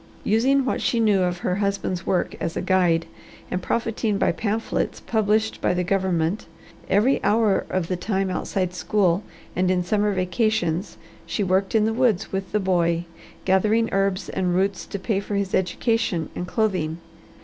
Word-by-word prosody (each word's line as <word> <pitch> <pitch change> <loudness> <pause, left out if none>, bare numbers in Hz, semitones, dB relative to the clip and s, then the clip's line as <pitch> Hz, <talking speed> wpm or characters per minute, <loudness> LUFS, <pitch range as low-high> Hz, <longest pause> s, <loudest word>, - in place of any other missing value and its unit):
Using 260 +5 +3
what - - -1
she 235 - +1
knew 210 -4 +3
of 180 -1 0
her 180 - +1
husband's 200 -3 -2
work 180 - 0
as 165 0 -3
a - - -1
guide, 175 -3 +2 0.5
and 180 - -1
profiting 225 0 -1
by - - +2
pamphlets 220 +1 -2
published 220 0 0
by 180 - +1
the 180 - 0
government, 185 -1 0 0.4
every 210 +8 +3
hour 210 -2 +2
of 185 -3 -1
the 185 - -1
time 190 +1 -1
outside 185 -1 -2
school 185 0 +1 0.3
and 180 0 +1
in 180 -1 +2
summer 205 +3 +1
vacations 185 -2 0 0.3
she 205 - -1
worked 190 +2 +1
in 215 -1 +4
the 220 - +1
woods 225 -5 +1
with 190 0 -3
the 210 - +1
boy, 170 -3 +1 0.4
gathering 215 +4 +3
herbs 195 -1 0
and 180 -2 -1
roots 195 +1 0
to - - -4
pay 195 +1 -1
for 200 +1 -4
his 200 -1 -1
education 185 -2 0
and 180 - -4
clothing. 180 -7 0
195 Hz, 170 wpm, -23 LUFS, 180-215 Hz, 0.5 s, in